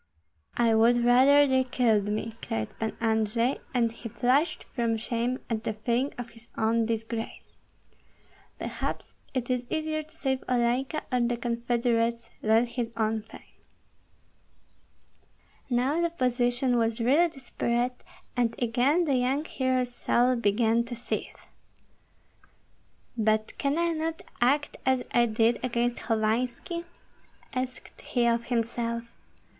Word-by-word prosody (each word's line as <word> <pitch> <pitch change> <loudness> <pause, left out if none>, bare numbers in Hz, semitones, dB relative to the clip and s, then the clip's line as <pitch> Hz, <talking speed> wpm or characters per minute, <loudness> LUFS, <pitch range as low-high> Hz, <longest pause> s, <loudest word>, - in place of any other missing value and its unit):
"I 235 -1 +4
would 235 +2 +4
rather 270 +4 +6
they 260 -1 +3
killed 230 -5 +2
me!" 215 +2 -2
cried 110 -1 -3
Pan 220 -1 -3
Andrei; 225 +2 +1
and 235 -2 +2
he 230 0 -8
flushed 275 +9 +1
from 230 -2 0
shame 235 +3 -2
and 225 -2 -2
the 220 -1 -2
feeling 235 +5 0
of 245 -1 -6
his 230 +1 -16
own 225 0 +2
disgrace. 225 0 -4 1.0
Perhaps - - -4 0.2
it 255 -1 -1
is 250 -1 0
easier 310 0 -1
to 310 - -16
save 265 -3 -2
Olenka 250 +4 +1
or 250 - +2
the 240 0 +1
confederates 235 0 0
than 220 +2 +4
his 235 -1 -3
own 220 0 +1
fame. 220 - -13 2.3
Now 260 +6 +1
the 340 - +2
position 245 -4 +1
was 225 0 0
really 285 +9 +4
desperate, 245 -3 -2 0.3
and 235 -2 +1
again 255 +8 +2
the 275 -4 +2
young 265 +5 +1
hero's 255 -3 0
soul 245 +1 +2
began 230 +1 +2
to 240 0 -5
seethe. 235 - -5 1.7
"But 215 -1 +1
can 280 +2 +1
I 340 0 +2
not 320 0 -3 0.2
act 285 +4 +2
as 260 -1 +2
I 240 0 +4
did 225 +2 +2
against 240 -1 0
Hovanski?" 240 +9 -1 0.7
asked 255 -1 -5
he 245 -2 0
of 235 0 +2
himself. 235 0 -2
240 Hz, 130 wpm, -28 LUFS, 230-255 Hz, 2.3 s, rather